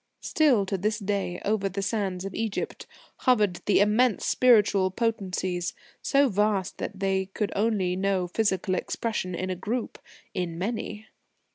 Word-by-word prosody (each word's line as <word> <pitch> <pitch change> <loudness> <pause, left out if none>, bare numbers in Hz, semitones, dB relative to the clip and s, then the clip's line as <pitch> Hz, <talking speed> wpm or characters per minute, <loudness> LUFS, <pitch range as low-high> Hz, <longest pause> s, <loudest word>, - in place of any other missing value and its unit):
Still 270 - +3
to 195 0 -2
this 215 +4 0
day, 200 -4 -2
over 200 -1 +1
the 195 +1 -3
sands 195 -3 -2
of 195 - -5
Egypt, 220 -3 -3 0.3
hovered 210 -8 +2
immense 210 +3 +3
spiritual 210 -6 +4
potencies, 185 -4 -2 0.3
so 280 0 +3
vast 205 -3 0
that 200 - -5
they 190 -1 +1
could 200 +2 -3
only 200 -4 +1
know 190 -1 0
physical 190 -1 0
expression 185 -1 -2
in 185 +2 -3
a - - -2
group 225 +7 -3 0.3
in 170 -2 -3
many. 215 +2 -4
200 Hz, 140 wpm, -27 LUFS, 185-220 Hz, 0.3 s, spiritual